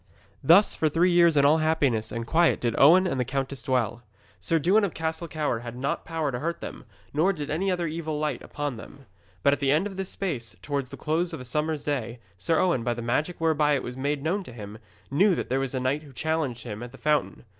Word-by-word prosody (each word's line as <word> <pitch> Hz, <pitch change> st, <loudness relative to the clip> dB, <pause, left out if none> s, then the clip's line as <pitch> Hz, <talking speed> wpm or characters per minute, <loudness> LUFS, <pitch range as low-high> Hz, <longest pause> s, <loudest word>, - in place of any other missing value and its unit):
Thus 170 Hz, +9 st, +6 dB
for 155 Hz, -, +1 dB
three 170 Hz, +4 st, +3 dB
years 170 Hz, -3 st, +5 dB
in 140 Hz, -, +5 dB
all 155 Hz, +3 st, +5 dB
happiness 140 Hz, -9 st, +1 dB
and 115 Hz, -1 st, -4 dB
quiet 165 Hz, +7 st, +3 dB
did 120 Hz, -2 st, 0 dB
Owen 175 Hz, +7 st, +7 dB
and 135 Hz, -8 st, -1 dB
the -, -, +2 dB
countess 135 Hz, 0 st, -3 dB
dwell. 120 Hz, -3 st, -1 dB, 0.4 s
Sir 165 Hz, -, +1 dB
Dewin 190 Hz, +8 st, +3 dB
of 195 Hz, -, -1 dB
Castle 160 Hz, +1 st, -3 dB
Cower 150 Hz, -7 st, -1 dB
had 120 Hz, 0 st, -8 dB
not 135 Hz, +3 st, -2 dB
power 160 Hz, -3 st, -2 dB
to 120 Hz, -, -3 dB
hurt 170 Hz, +4 st, -3 dB
them, -, -, -8 dB, 0.3 s
nor 160 Hz, +7 st, +3 dB
did 150 Hz, -5 st, -5 dB
any 185 Hz, +6 st, 0 dB
other 175 Hz, -2 st, 0 dB
evil 155 Hz, -1 st, -3 dB
light 150 Hz, 0 st, -2 dB
upon 145 Hz, -4 st, -4 dB
them. 135 Hz, +4 st, -12 dB, 0.4 s
But 140 Hz, -, +5 dB
at -, -, -1 dB
the 140 Hz, -, +1 dB
end 155 Hz, +7 st, +3 dB
of 195 Hz, -2 st, -6 dB
this 190 Hz, -1 st, -3 dB
space, 130 Hz, -, -4 dB
towards 140 Hz, -3 st, -2 dB
the -, -, -9 dB
close 165 Hz, +3 st, -1 dB
of 160 Hz, -, -5 dB
a 125 Hz, -, -8 dB
summer's 150 Hz, +4 st, -1 dB
day, 125 Hz, -5 st, -2 dB, 0.2 s
Sir 95 Hz, -, 0 dB
Owen, 170 Hz, -10 st, +2 dB
by 120 Hz, 0 st, 0 dB
the 120 Hz, -, -5 dB
magic 150 Hz, +9 st, -1 dB
whereby 155 Hz, -2 st, +2 dB
it 135 Hz, -, -2 dB
was 125 Hz, -, -6 dB
made 140 Hz, +2 st, -2 dB
known 190 Hz, +6 st, 0 dB
to -, -, -10 dB
him, 105 Hz, -2 st, -9 dB, 0.3 s
knew 185 Hz, +6 st, +4 dB
that -, -, -4 dB
there 130 Hz, +2 st, +1 dB
was 135 Hz, 0 st, -2 dB
a -, -, 0 dB
knight 130 Hz, +4 st, 0 dB
who 145 Hz, -3 st, -14 dB
challenged 150 Hz, -5 st, -2 dB
him 110 Hz, -2 st, -6 dB
at 120 Hz, 0 st, -7 dB
the -, -, -11 dB
fountain. 150 Hz, -1 st, 0 dB
150 Hz, 245 wpm, -26 LUFS, 125-165 Hz, 0.4 s, Owen